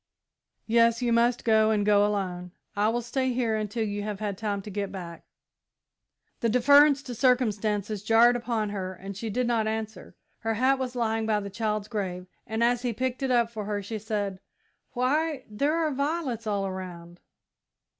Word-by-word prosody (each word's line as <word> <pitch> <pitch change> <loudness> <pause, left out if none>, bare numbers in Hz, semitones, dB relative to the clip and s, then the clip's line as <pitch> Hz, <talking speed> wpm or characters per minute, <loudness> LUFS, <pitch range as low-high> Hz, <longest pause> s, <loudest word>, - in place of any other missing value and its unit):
"Yes, 230 +1 +3
you 235 -1 +2
must 235 +1 +2
go, 220 -1 +4
and 210 -2 +1
go 205 -1 +5
alone. 180 -4 -2 0.2
I 205 +1 +2
will 240 +1 -1
stay 260 +2 -1
here 235 -3 0
until 215 +1 -2
you 205 -1 -3
have 205 -1 -4
had 205 -2 -2
time 200 -1 -3
to 210 - -8
get 200 0 -3
back." 175 -3 -8 1.1
The 230 - +1
deference 285 +4 +5
to 250 - -6
circumstances 215 -5 +1
jarred 230 +3 +5
upon 230 -3 -1
her 190 -2 -4
and 195 +2 -8
she 220 +3 -4
did 250 +4 0
not 230 -2 +1
answer. 220 -4 -5 0.2
Her 225 -1 -1
hat 260 +4 +2
was 255 -1 -3
lying 225 -2 0
by 215 -1 +2
the 200 -1 -6
child's 215 -1 -2
grave, 185 -5 -4 0.2
and 220 +1 -1
as 240 0 +2
he 245 -2 -1
picked 255 +3 -2
it 270 - 0
up 235 -2 +2
for 215 -3 -5
her, 205 -1 -3
she 215 +2 -5
said: 205 -3 -3 0.5
"Why, 280 +3 0
there 280 +9 0
are 320 -2 +1
violets 280 -5 -2
all 200 -2 0
around. 180 -2 -7
220 Hz, 185 wpm, -27 LUFS, 205-245 Hz, 1.1 s, go